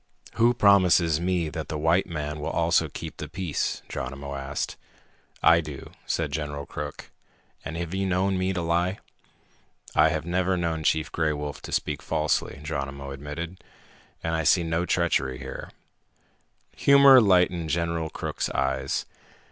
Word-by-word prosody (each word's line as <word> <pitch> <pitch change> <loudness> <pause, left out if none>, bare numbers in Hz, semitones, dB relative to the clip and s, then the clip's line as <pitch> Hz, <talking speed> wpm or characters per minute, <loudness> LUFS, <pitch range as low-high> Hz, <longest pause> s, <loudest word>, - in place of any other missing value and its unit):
"Who 120 +2 +3
promises 90 -7 +4
me 90 -3 0
that 80 -1 -5
the 75 - -3
white 80 +5 +2
man 75 -3 -4
will 75 - -3
also 85 0 +2
keep - - -7
the - - -5
peace?" 90 -6 -3
Geronimo 70 +2 -5
asked. 70 +1 -4 0.7
"I 85 0 +6
do," 75 -4 -9 0.2
said 80 -3 -1
General 75 -1 -4
Crook. - - -7 0.5
"And 80 - -5
have 85 0 -4
you 95 0 0
known 95 +1 +1
me 95 +1 0
to 90 -2 -2
lie?" 85 +3 +1 1.0
"I - - +5
have 80 0 -2
never 90 +1 +1
known 85 -2 -1
Chief 80 0 +1
Gray 80 -2 0
Wolf 75 -1 -5
to - - -8
speak - - -1
falsely," 75 -2 -1
Geronimo 70 -2 -4
admitted. 75 +6 -7 0.6
"And 80 - -1
I 80 0 0
see 85 +3 +4
no 85 +2 -1
treachery 65 -7 +1
here." 65 0 -7 1.1
Humor 140 -2 +8
lighted 90 -4 +3
General 85 0 -1
Crook's - - -3
eyes. 65 0 -1
80 Hz, 150 wpm, -26 LUFS, 75-90 Hz, 1.1 s, Humor